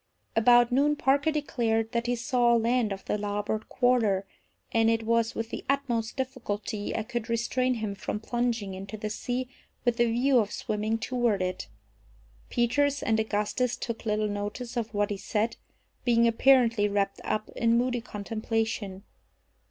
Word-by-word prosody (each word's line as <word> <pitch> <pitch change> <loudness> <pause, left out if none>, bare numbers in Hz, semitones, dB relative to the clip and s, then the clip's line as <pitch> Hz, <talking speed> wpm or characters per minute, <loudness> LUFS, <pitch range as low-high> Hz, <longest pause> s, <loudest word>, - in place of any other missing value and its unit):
About 240 +1 +5
noon 285 +4 +3
Parker 280 +2 +2
declared 230 -7 0
that 235 -1 -1
he 245 - +1
saw 240 0 +2
land 230 -1 +2
off 195 0 -5
the 210 - -1
larboard 205 +1 -2
quarter, 230 -6 +2 0.5
and 225 0 +3
it 225 0 +1
was 230 0 +1
with 225 +1 -4
the - - -5
utmost 245 -5 0
difficulty 225 -5 -3
I 220 - -1
could 240 0 -4
restrain 250 +2 +1
him 215 -3 -3
from 205 +1 -4
plunging 230 -3 -1
into 195 +3 -7
the 215 0 -4
sea 245 +3 -3 0.4
with 240 -1 +2
the 235 -1 +3
view 250 +2 +3
of 210 -2 0
swimming 215 +1 -1
toward 235 -4 0
it. 185 0 -3 0.8
Peters 285 +4 +1
and 220 -1 +2
Augustus 220 +3 0
took 230 -1 -5
little 215 -1 0
notice 210 +4 -4
of 230 -2 -2
what 205 0 +1
he 205 - -2
said, 215 +3 -1 0.5
being 235 -1 +4
apparently 230 -3 +4
wrapped 200 -1 -1
up 215 0 -2
in 230 0 +3
moody 245 0 0
contemplation. 215 -2 -3
230 Hz, 160 wpm, -28 LUFS, 210-245 Hz, 0.8 s, About